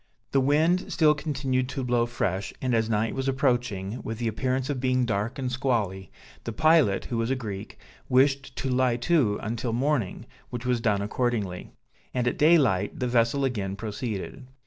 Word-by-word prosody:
The 135 Hz, -, +3 dB
wind 155 Hz, +7 st, +2 dB
still 155 Hz, -3 st, +4 dB
continued 135 Hz, -4 st, -1 dB
to 135 Hz, -1 st, -3 dB
blow 120 Hz, -1 st, +1 dB
fresh, 100 Hz, -5 st, -2 dB
and 130 Hz, -1 st, -1 dB
as 110 Hz, -1 st, +1 dB
night 110 Hz, +1 st, 0 dB
was 135 Hz, 0 st, -3 dB
approaching, 125 Hz, -6 st, 0 dB
with 115 Hz, -, -5 dB
the 120 Hz, 0 st, -2 dB
appearance 130 Hz, +4 st, -1 dB
of 145 Hz, -3 st, -2 dB
being 130 Hz, -1 st, +1 dB
dark 110 Hz, 0 st, -2 dB
and 130 Hz, -2 st, -2 dB
squally, 110 Hz, -8 st, -1 dB, 0.3 s
the 115 Hz, -, -4 dB
pilot, 155 Hz, -7 st, +3 dB
who 120 Hz, -, -2 dB
was 115 Hz, +1 st, 0 dB
a 135 Hz, -, +1 dB
Greek, 105 Hz, -6 st, -6 dB, 0.3 s
wished 135 Hz, 0 st, +2 dB
to 135 Hz, -, -3 dB
lie 125 Hz, -1 st, +2 dB
to 120 Hz, -6 st, +2 dB
until 115 Hz, +1 st, -2 dB
morning, 130 Hz, -4 st, -1 dB, 0.2 s
which 120 Hz, 0 st, -6 dB
was 125 Hz, -2 st, +1 dB
done 105 Hz, -4 st, +1 dB
accordingly; 105 Hz, -4 st, -2 dB, 0.5 s
and 125 Hz, -1 st, +1 dB
at -, -, -1 dB
daylight 135 Hz, -, +3 dB
the 125 Hz, -, 0 dB
vessel 120 Hz, +3 st, +2 dB
again 100 Hz, -7 st, -2 dB
proceeded. 110 Hz, +4 st, -5 dB
125 Hz, 175 wpm, -26 LUFS, 110-135 Hz, 0.5 s, still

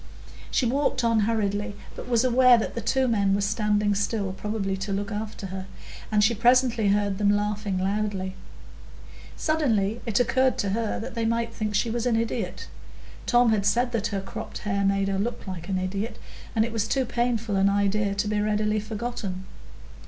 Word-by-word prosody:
She 255 Hz, -, +1 dB
walked 255 Hz, 0 st, +1 dB
on 230 Hz, -1 st, +3 dB
hurriedly, 205 Hz, -1 st, -1 dB, 0.2 s
but -, -, -8 dB
was 235 Hz, -1 st, +3 dB
aware 250 Hz, 0 st, +6 dB
that 225 Hz, -, -2 dB
the 235 Hz, -, -4 dB
two 265 Hz, +2 st, +1 dB
men 200 Hz, -4 st, +2 dB
were 200 Hz, -, 0 dB
standing 210 Hz, 0 st, +1 dB
still, 200 Hz, 0 st, -1 dB
probably 195 Hz, 0 st, -3 dB
to 190 Hz, +2 st, -4 dB
look 200 Hz, +2 st, -2 dB
after 210 Hz, -1 st, -5 dB
her, 190 Hz, 0 st, -5 dB, 0.4 s
and 210 Hz, -1 st, +3 dB
she 225 Hz, +3 st, +4 dB
presently 240 Hz, -1 st, +3 dB
heard 200 Hz, -1 st, +1 dB
them 205 Hz, -1 st, +3 dB
laughing 205 Hz, -1 st, 0 dB
loudly. 195 Hz, 0 st, -1 dB, 1.0 s
Suddenly 235 Hz, -9 st, +1 dB
it 220 Hz, 0 st, +2 dB
occurred 260 Hz, +1 st, +2 dB
to 200 Hz, -, -1 dB
her 220 Hz, +2 st, -1 dB
that 225 Hz, -, -6 dB
they 230 Hz, -1 st, -1 dB
might 230 Hz, 0 st, 0 dB
think 215 Hz, -2 st, -3 dB
she 225 Hz, +2 st, +1 dB
was 240 Hz, +1 st, -1 dB
an 235 Hz, -, +2 dB
idiot; 225 Hz, -4 st, -2 dB, 0.6 s
Tom 240 Hz, -2 st, +4 dB
had 210 Hz, -2 st, +2 dB
said 240 Hz, +5 st, +2 dB
that 230 Hz, -2 st, 0 dB
her 200 Hz, -3 st, -3 dB
cropped 195 Hz, -, -7 dB
hair 200 Hz, -1 st, 0 dB
made 195 Hz, 0 st, +2 dB
her 195 Hz, -1 st, -1 dB
look 235 Hz, +5 st, -3 dB
like 185 Hz, -2 st, -7 dB
an 190 Hz, -, 0 dB
idiot, 200 Hz, +5 st, -3 dB, 0.4 s
and 220 Hz, 0 st, +3 dB
it 230 Hz, -, -5 dB
was 220 Hz, -1 st, 0 dB
too 265 Hz, +2 st, +1 dB
painful 230 Hz, -3 st, -1 dB
an 195 Hz, +1 st, +4 dB
idea 200 Hz, 0 st, +1 dB
to 205 Hz, +1 st, 0 dB
be 210 Hz, 0 st, 0 dB
readily 210 Hz, 0 st, +1 dB
forgotten. 210 Hz, -3 st, -5 dB
210 Hz, 190 wpm, -26 LUFS, 200-230 Hz, 1.0 s, aware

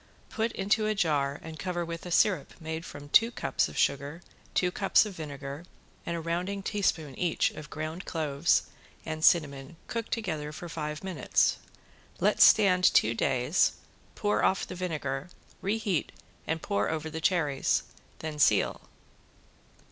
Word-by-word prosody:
Put 225 Hz, +1 st, -1 dB
into 215 Hz, +2 st, +1 dB
a 215 Hz, -, 0 dB
jar 145 Hz, -6 st, +1 dB
and 160 Hz, -1 st, -8 dB
cover 175 Hz, -2 st, -2 dB
with 165 Hz, +1 st, -6 dB
a -, -, -5 dB
sirup 185 Hz, +2 st, +2 dB
made 160 Hz, 0 st, -5 dB
from 145 Hz, 0 st, -10 dB
two 225 Hz, +9 st, +6 dB
cups 240 Hz, -, -1 dB
of -, -, -10 dB
sugar, 140 Hz, +5 st, 0 dB, 0.3 s
two 180 Hz, -1 st, +2 dB
cups 195 Hz, +3 st, +3 dB
of 210 Hz, -, -6 dB
vinegar 145 Hz, -1 st, -7 dB, 0.4 s
and 170 Hz, -, -1 dB
a -, -, -3 dB
rounding 180 Hz, +4 st, -2 dB
teaspoon 175 Hz, -9 st, -1 dB
each 175 Hz, -3 st, +1 dB
of 150 Hz, -1 st, -10 dB
ground 155 Hz, +4 st, -5 dB
cloves 155 Hz, -1 st, +1 dB, 0.4 s
and 155 Hz, -1 st, -4 dB
cinnamon 145 Hz, -3 st, +2 dB
cooked 230 Hz, -1 st, -4 dB
together 155 Hz, -10 st, -2 dB
five 155 Hz, -1 st, -5 dB
minutes. 190 Hz, -2 st, +1 dB, 0.6 s
Let -, -, +2 dB
stand 185 Hz, -4 st, +6 dB
two 115 Hz, -9 st, +5 dB
days, 120 Hz, +2 st, +2 dB, 0.4 s
pour 105 Hz, +1 st, 0 dB
off 190 Hz, -, +2 dB
the -, -, -8 dB
vinegar, 155 Hz, -5 st, -3 dB, 0.3 s
reheat 200 Hz, -4 st, -1 dB, 0.4 s
and 160 Hz, 0 st, -2 dB
pour 100 Hz, +1 st, 0 dB
over 160 Hz, 0 st, -3 dB
the 160 Hz, +1 st, -5 dB
cherries, 160 Hz, -6 st, +1 dB, 0.3 s
then 155 Hz, -1 st, -6 dB
seal. -, -, +3 dB
160 Hz, 150 wpm, -29 LUFS, 150-185 Hz, 0.6 s, two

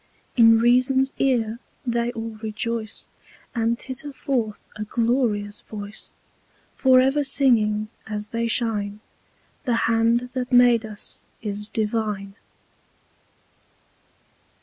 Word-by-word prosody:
In 225 Hz, -2 st, +7 dB
Reason's 255 Hz, +3 st, +3 dB
Ear 235 Hz, -4 st, +1 dB, 0.3 s
they 235 Hz, 0 st, 0 dB
all 225 Hz, -1 st, -5 dB
rejoice, 220 Hz, 0 st, -3 dB, 0.5 s
And 230 Hz, 0 st, +1 dB
titter 270 Hz, +3 st, -7 dB
forth 250 Hz, -5 st, -2 dB
a 215 Hz, -, -4 dB
glorious 225 Hz, -2 st, 0 dB
Voice, 205 Hz, 0 st, -8 dB, 0.6 s
For 260 Hz, -2 st, +5 dB
ever 270 Hz, +3 st, +3 dB
singing, 225 Hz, -6 st, +2 dB, 0.2 s
as 210 Hz, -1 st, -4 dB
they 230 Hz, 0 st, -1 dB
shine, 215 Hz, -3 st, -1 dB, 0.6 s
"The 245 Hz, -3 st, +2 dB
Hand 230 Hz, +2 st, +2 dB
that 255 Hz, 0 st, -3 dB
made 245 Hz, -2 st, +5 dB
us 210 Hz, -1 st, -7 dB, 0.2 s
is 210 Hz, 0 st, -3 dB
Divine." 210 Hz, -3 st, -2 dB
230 Hz, 105 wpm, -24 LUFS, 215-250 Hz, 0.6 s, In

